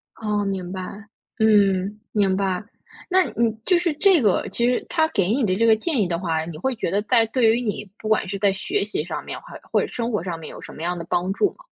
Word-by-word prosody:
哦， 210 -2 -1
明 190 -2 -3
白。 185 -1 -4 0.6
嗯， 205 -2 +3
明 195 -3 +2
白。 190 -1 -1 0.5
那 375 0 +5
你 230 -1 +2
就 365 - +4
是 350 -2 +1
这 360 +1 +4
个 205 -5 +2
其 235 +5 +1
实 250 - +1
他 320 -2 +2
给 195 - +1
你 260 0 +1
的 185 -2 +1
这 230 - +2
个 225 -1 +6
建 270 +3 -1
议 195 - +2
的 170 -1 -1
话， 160 -3 -1
你 165 -2 -7
会 255 +10 -1
觉 195 - -2
得 200 - +2
在 230 0 +4
对 225 -1 +3
于 245 - -1
你 210 -3 -3
不 215 - -7
管 215 -3 +2
是 200 - -3
在 200 -1 +2
学 365 - -1
习 - - -2
上 - - -5
面， - - -6
还 - - -11
或 - - +3
者 - - -2
生 235 0 -3
活 210 -6 -1
上 170 -3 -4
面 160 - -8
有 - - -10
什 - - -10
么 155 - -10
样 175 +1 -1
的 165 - -6
帮 180 +2 0
助 400 - +2
吗？ - - -19
210 Hz, 280 characters per minute, -23 LUFS, 185-240 Hz, 0.6 s, 个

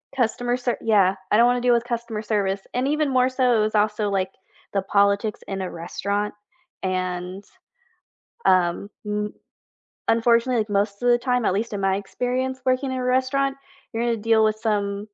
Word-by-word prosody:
customer 245 0 0
ser" 245 -1 -1
Yeah, 200 -4 +3 0.2
I 210 - +5
don't 235 - +6
wanna 245 0 +2
deal 245 -1 +4
with 235 - +1
customer 235 -3 -3
service, 200 -2 0
and 255 +2 0
even 300 0 +1
more 255 0 +3
so 250 -2 +2
it - - +2
was 215 +1 0
also, 210 0 +1
like, 190 -1 -1 0.4
the 195 - +1
politics 200 +2 +1
in 195 -1 -3
a 185 - -4
restaurant, 200 +5 -3 0.5
and, 185 +1 -3 1.0
um, 180 +1 +3 0.2
m 210 0 -2 0.7
Unfortunately, 235 +1 +3
like, 215 0 -1
most 200 0 0
of 245 - +4
the 240 - +6
time, 250 -1 0
at - - +2
least 220 +3 -2
in 205 - -3
my 195 0 +2
experience 255 +5 -2
working 260 +1 +1
in 260 - -2
a 250 - -2
restaurant, 265 +2 +1 0.4
you're 225 +1 -2
gonna 235 -1 +1
deal 225 0 +3
with 215 0 +2
some 205 -2 -1
220 Hz, 180 wpm, -23 LUFS, 200-245 Hz, 1.0 s, don't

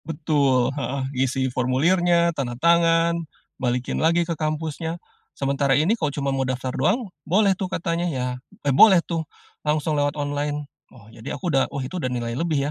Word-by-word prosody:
Betul 145 -5 +1
heeh, 135 -1 -3
isi 130 0 0
formulirnya, 170 +7 +2
tanda 125 -5 -4
tangan, 170 +2 +3 0.4
balikin 125 0 -1
lagi 170 +2 +3
ke 170 - -2
kampusnya, 160 +1 -3 0.4
sementara 140 0 +1
ini 160 +9 +3
kok 165 -10 -1
cuma 140 -1 -1
mau 135 - -1
daftar 130 0 -2
doang, 190 - 0
boleh 195 +6 +3
tuh 185 0 -4
katanya, 170 -1 -1
ya, 130 -5 -2 0.4
e - - +2
boleh 180 +4 +7
tuh, 165 -2 -2 0.4
langsung 150 +1 0
lewat 145 0 0
online. 145 0 -2 0.2
Oh, 115 -5 -17
jadi 115 +3 -6
aku 175 -4 -3
udah 135 - +2
oh - - -5
itu 180 +7 -5
udah 130 - -1
nilai 120 -1 -3
lebih 160 +1 0
150 Hz, 170 wpm, -23 LUFS, 135-170 Hz, 0.4 s, boleh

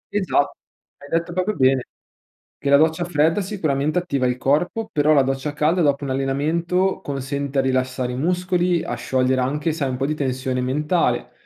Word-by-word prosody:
Esa 195 -3 0 0.6
hai 140 - -12
detto 170 +1 -1
proprio 185 +3 -1
bene, 130 -1 +2 0.7
che 140 - -2
la 140 - +7
doccia 160 +3 +2
fredda 165 +3 +2
sicuramente 155 -6 -1
attiva 140 -8 -1
il 125 0 -1
corpo, 175 - 0
però 150 +1 +3
la 140 -2 +5
doccia 135 +2 -2
calda 160 +4 +1
dopo 145 -1 +1
un 135 - -3
allenamento 160 +8 0
consente 140 0 -4
a - - +5
rilassare 130 -1 -1
i - - -4
muscoli 180 +1 +1
a - - -4
sciogliere 130 +2 0
anche, 150 +5 -1
sai, 140 -5 -2
un 125 - -3
po' 135 - -1
di 155 - 0
tensione 130 -2 -2
mentale, 150 +7 0
145 Hz, 180 wpm, -22 LUFS, 130-170 Hz, 0.7 s, la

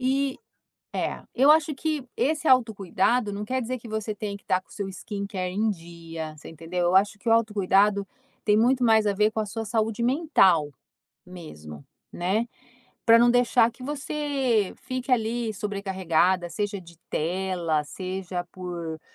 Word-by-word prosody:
E 270 +1 0 0.6
é, - - -2
eu 270 +4 +5
acho 310 0 +3
que 305 -1 -2
esse 310 +2 0
autocuidado 220 -2 +2
não 205 +1 -4
quer 260 +3 -1
dizer 255 +2 -3
que 230 -1 -11
você 215 -1 -3
tenha 205 -1 -4
que - - -26
estar 185 - +1
com - - -38
o - - -20
seu 200 -2 -4
skin 200 +2 -6
care 185 -3 -3
em 220 +2 +1
dia, 165 -3 -8
você - - -11
entendeu. 165 +2 -3
Eu 175 +2 +2
acho 205 +2 +3
que 200 - -11
o - - +4
autocuidado 205 -2 +3 0.4
tem 210 - +4
muito 250 +3 +3
mais 220 -2 +4
a 205 - +2
ver 210 +2 +2
com 220 - -3
a 215 - 0
sua 225 +2 -4
saúde 220 +1 -1
mental 235 - +3 0.6
mesmo, 75 - -10 0.3
né, 195 +7 0 0.6
pra 230 0 +7
não 240 - +5
deixar 245 -1 +4
que 245 - -15
você 275 -6 -1
fique 255 +1 -4
ali 230 -1 0
sobrecarregada, 190 -3 0
seja 205 +3 -3
de 170 -1 -15
tela, 170 -2 -1
seja 185 +1 -5
por, 170 -3 -6
205 Hz, 170 wpm, -26 LUFS, 180-240 Hz, 0.6 s, pra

